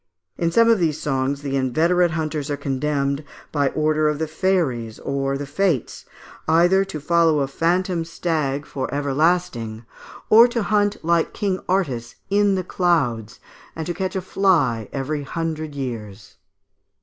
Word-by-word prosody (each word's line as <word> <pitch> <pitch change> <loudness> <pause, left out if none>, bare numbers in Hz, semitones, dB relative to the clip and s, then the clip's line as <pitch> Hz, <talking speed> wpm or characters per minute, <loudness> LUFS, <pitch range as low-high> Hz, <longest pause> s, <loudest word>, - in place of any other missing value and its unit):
In 170 - 0
some 230 +6 +5
of 230 -3 +4
these 155 -3 0
songs 135 0 -1
the 140 -1 -2
inveterate 165 +7 +2
hunters 155 -3 -3
are 145 - -1
condemned, 140 +1 -1 0.3
by 145 -2 +1
the - - -4
order 155 0 +2
of 150 - -1
Fairies 155 - 0
or 135 0 -2
of - - -1
the 145 - -5
Fates, 150 - -1 0.4
either 175 +4 +4
to 195 -5 -6
follow 160 0 +3
a 135 - 0
phantom 175 +4 0
stag 155 -4 -2
for 135 -2 -4
everlasting, 140 -6 0 0.4
or 230 +3 +8
to 240 -2 -2
hunt, 205 0 +1
like 170 -1 +2
King 195 -2 -1
Artus, 130 -12 -1 0.2
in 205 -1 +3
the 185 - -1
clouds 135 - 0 0.4
and 160 - -4
to 175 - -2
catch 190 +3 -3
a 190 - -1
fly 160 - +1
every 145 +2 -3
hundred 155 0 -4
years. 110 -8 -6
155 Hz, 155 wpm, -22 LUFS, 135-180 Hz, 0.4 s, or